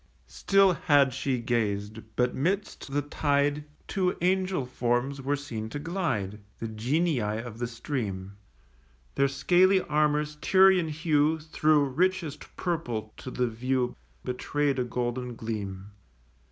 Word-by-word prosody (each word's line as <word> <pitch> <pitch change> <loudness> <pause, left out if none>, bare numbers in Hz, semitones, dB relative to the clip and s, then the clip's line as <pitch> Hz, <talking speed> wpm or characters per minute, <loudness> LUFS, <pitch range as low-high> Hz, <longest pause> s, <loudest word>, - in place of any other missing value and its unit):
Still 195 -1 +3
had 145 -6 +3
she 135 0 -1
gazed; 110 -3 -1 0.2
but 125 +1 +1
'midst 185 0 -2
the 145 +1 0
tide 145 0 0 0.2
Two 185 -2 0
angel 185 -4 +1
forms 125 +2 -1
were 140 +2 0
seen 115 -6 -5
to 130 - -5
glide, 145 - -2 0.2
The 115 - -5
Genii 135 +8 0
of 110 +2 -4
the 120 - -1
stream: 105 -6 -4 0.8
Their 140 - +3
scaly 180 +7 +4
armour's 150 -1 +1
Tyrian 190 0 +5
hue 155 0 +2
Thro' 155 0 +2
richest 165 +2 -1
purple 120 - -3
to - - -7
the 125 -1 0
view 125 +2 -1 0.3
Betray'd 140 +2 -1
a - - +2
golden 125 0 -3
gleam. 100 -3 -5
140 Hz, 125 wpm, -28 LUFS, 120-155 Hz, 0.8 s, Tyrian